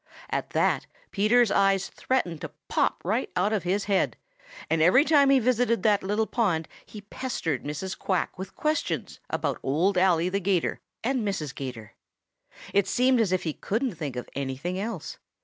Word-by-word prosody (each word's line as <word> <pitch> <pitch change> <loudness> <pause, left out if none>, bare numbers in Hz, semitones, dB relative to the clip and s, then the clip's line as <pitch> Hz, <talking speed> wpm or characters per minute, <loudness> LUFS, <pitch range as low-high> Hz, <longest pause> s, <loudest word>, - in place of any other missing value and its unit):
At - - -2
that - - +1 0.2
Peter's 215 +3 +3
eyes 195 -1 +3
threatened 180 -12 -1
to - - -5 0.2
pop - - +1
right 220 +8 0
out 200 +4 +1
of 210 - +1
his 190 +4 0
head 190 - +1 0.5
and 160 0 +1
every 185 - +6
time 285 -4 +5
he 275 - +6
visited 245 -1 +2
that 210 -2 +4
little 210 +3 0
pond 185 -10 0 0.2
he 210 - -9
pestered 200 - -3
Mrs. 150 +6 -4
Quack 190 -2 -1
with 190 +1 -8
questions 305 0 -2
about - - -1
Old 180 +8 +2
Ally 180 -2 +3
the 195 +2 0
'Gator 190 -3 0 0.2
and 255 +1 0
Mrs. 195 -10 -2
'Gator. 125 -6 -7 0.8
It 200 -1 +3
seemed 255 -1 +3
as 205 -5 +1
if 185 - +1
he 160 - -2
couldn't 230 - -2
think 150 -6 -5
of 125 - -5
anything 140 +7 -3
else. 225 +3 -5
195 Hz, 170 wpm, -27 LUFS, 165-230 Hz, 0.8 s, every